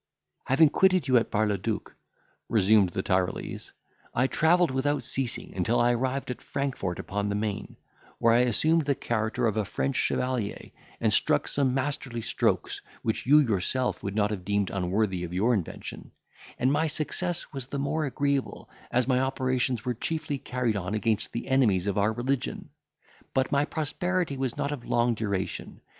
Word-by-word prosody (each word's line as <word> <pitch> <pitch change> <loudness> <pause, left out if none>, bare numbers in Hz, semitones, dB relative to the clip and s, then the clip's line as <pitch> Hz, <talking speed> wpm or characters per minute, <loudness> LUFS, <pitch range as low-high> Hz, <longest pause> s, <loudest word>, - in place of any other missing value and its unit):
"Having 145 +4 +5
quitted 185 +1 +3
you 130 - +3
at 115 - +1
Bar 110 0 +2
le 105 -2 0
duc," 110 +2 -3 0.5
resumed 105 -2 +4
the 95 +2 -3
Tyrolese, 95 -1 -1 0.4
"I 130 - +3
travelled 165 +3 +3
without 145 +3 0
ceasing, 130 -3 -3
until 105 +6 +1
I 120 +1 +4
arrived 130 +2 -1
at 125 - -7
Frankfort 135 -10 -3
upon 100 +1 -3
the 100 - -1
Maine, 105 -1 -3 0.4
where 115 0 +4
I 120 - +5
assumed 155 +7 +3
the 140 -1 +1
character 115 +1 -1
of 110 -1 +1
a 110 - +2
French 135 +6 -2
chevalier, 125 -5 -1 0.3
and - - +2
struck - - +2
some 135 -3 +1
masterly 130 -4 -2
strokes, - - 0 0.2
which 110 +2 -1
you 145 +3 +7
yourself 120 +2 0
would 100 0 -4
not 105 -1 +2
have 100 -4 -4
deemed 100 0 0
unworthy 95 0 0
of 85 0 -5
your 110 +7 +2
invention; 95 -8 -4 0.5
and 130 +2 +2
my 160 +2 +2
success 165 +3 -3
was 135 -3 -5
the 140 - -4
more 145 +3 0
agreeable, 140 0 -2 0.2
as 125 0 +1
my 130 -1 +3
operations 130 -2 0
were 125 - 0
chiefly 150 +3 -3
carried 125 -4 -1
on 100 +1 -2
against 110 -1 0
the 115 - -5
enemies 110 -9 +3
of 100 0 0
our 105 +2 +3
religion. 125 +3 -2 0.7
But 130 +1 +1
my 140 0 +3
prosperity 170 +2 -1
was 130 -2 -2
not 145 0 -1
of 140 -5 -5
long 120 0 +2
duration. 100 -4 -3
125 Hz, 175 wpm, -27 LUFS, 105-140 Hz, 0.7 s, you